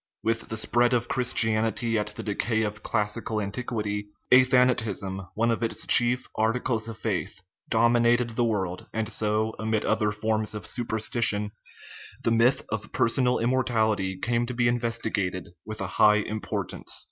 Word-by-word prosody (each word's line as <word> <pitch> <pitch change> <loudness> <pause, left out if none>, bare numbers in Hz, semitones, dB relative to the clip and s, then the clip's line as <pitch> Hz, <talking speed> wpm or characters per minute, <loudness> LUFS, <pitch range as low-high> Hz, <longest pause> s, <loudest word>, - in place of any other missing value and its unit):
With 115 0 -1
the 110 - -2
spread 120 +3 +2
of 120 0 -1
Christianity 115 -2 +1
at 105 -1 0
the - - -6
decay 110 +2 -1
of 105 0 -4
classical 110 0 -1
antiquity, 105 -1 -4 0.2
athanatism, 125 -7 +3 0.2
one 115 +2 +1
of 115 - -2
its 115 - +1
chief 120 +1 +4
ar 110 +1 +2
ticles 115 -2 -1
of 110 - -8
faith, 100 -2 -4 0.3
dominated 120 +1 +3
the 120 +2 0
world, 95 -6 -2
and 110 -1 -2
so, 110 +1 0
amid 110 -1 -1
other 110 -1 +1
forms 110 0 -1
of 105 - -6
superstition, 110 -3 +1 0.7
the 115 - +2
myth 115 +3 +3
of 110 -1 -4
personal 125 +1 +2
immortal 120 -2 +1
ity 95 -2 -4
came 120 +4 -1
to 125 - -5
be 120 0 +2
invested 110 -6 -2 0.2
with 110 0 -7
a - - -2 0.2
high 105 0 +7
importance. 105 0 -3
110 Hz, 155 wpm, -26 LUFS, 105-120 Hz, 0.7 s, high